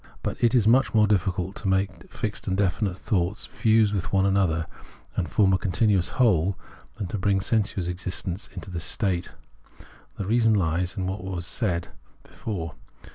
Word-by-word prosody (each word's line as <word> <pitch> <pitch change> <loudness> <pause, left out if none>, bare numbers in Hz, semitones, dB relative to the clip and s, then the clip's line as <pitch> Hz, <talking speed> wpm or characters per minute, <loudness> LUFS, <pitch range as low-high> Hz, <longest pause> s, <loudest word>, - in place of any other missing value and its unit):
But - - -3
it 120 +1 +4
is 110 -4 +4
much 125 +1 +4
more 110 -1 +6
difficult 95 -2 0
to 100 - -4
make 95 +1 -1
fixed 110 0 -4
and 95 0 0
definite 95 0 0
thoughts 95 -1 -1
fuse 110 -2 +2
with 95 -4 -2
one 95 0 +3
another 95 -4 +2 0.5
and 85 - -1
form 95 -3 +3
a 95 - +2
continuous 95 -1 +2
whole 95 -7 +3 0.4
than 105 - -4
to 105 - -3
bring 100 -1 +2
sensuous 100 -3 0
existence 90 +1 -3
into 95 - -8
this 85 -2 -3
state. 95 -5 -1 0.8
The 100 - -3
reason 115 +1 +3
hes 90 +1 0
in 95 - -1
what 95 0 -3
was 90 -2 -4
said 90 -5 -1 0.3
before. 85 -8 -5
95 Hz, 170 wpm, -25 LUFS, 90-105 Hz, 0.8 s, more